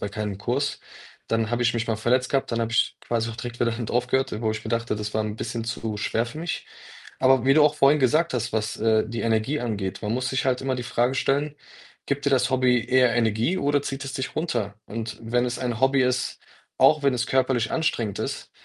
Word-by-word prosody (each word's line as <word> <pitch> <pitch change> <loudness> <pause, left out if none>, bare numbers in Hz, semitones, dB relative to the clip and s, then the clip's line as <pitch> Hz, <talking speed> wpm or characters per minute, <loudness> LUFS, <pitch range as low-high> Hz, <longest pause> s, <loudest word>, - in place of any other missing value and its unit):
bei 100 - -2
keinem 105 -1 -4
Kurs. 105 - -2 0.5
Dann 115 -1 0
habe 120 0 0
ich 120 - +3
mich 115 0 -2
mal 110 -2 0
verletzt 125 +4 +1
gehabt, 135 -1 0
dann 115 - 0
habe 115 0 -2
ich 115 - +2
quasi 115 -1 -1
auch 115 - -9
direkt 120 0 -6
wieder 120 -1 +3
damit 115 -1 -4
aufgehört, 125 +2 +1
äh, 105 +2 -4
wo 110 - +1
ich 110 - -4
mir - - -5
dachte, 115 -2 -1
das 105 0 -5
war 110 - +1
'n 105 0 -4
bisschen 115 0 -4
zu 115 -2 -3
schwer 115 +3 -1
für 150 +6 -8
mich. 170 +1 -4 0.5
Aber 130 -2 +4
wie 135 - +5
du 155 +1 +6
auch 150 0 +4
vorhin 140 +2 +4
gesagt 155 +6 +3
hast, 115 -3 -2
was, 110 0 -1
äh, 110 -1 +2
die 115 +1 -4
Energie 115 +6 0
angeht, 105 -5 -3
man 105 +1 -2
muss 125 0 -1
sich 130 0 -1
halt 130 0 +1
immer 130 -1 0
die 125 - -4
Frage 120 +2 +1
stellen, 140 +3 0 0.5
gibt 140 0 -2
dir 140 - +2
das 130 -1 +3
Hobby 125 -2 +2
eher 125 -2 +4
Energie 120 - +1
oder 145 -2 +1
zieht 135 0 -4
es 135 - -6
dich 130 -1 -4
runter? 120 -11 -2
Und 110 -1 -5
wenn 120 +2 +1
es 120 0 -2
ein 120 -3 -3
Hobby 135 0 +4
ist, 125 0 0 0.4
auch 155 -1 +5
wenn 140 -1 +3
es 125 0 -1
körperlich 130 -3 +1
anstrengend 115 -10 -1
ist, - - -4
120 Hz, 240 wpm, -25 LUFS, 115-135 Hz, 0.5 s, du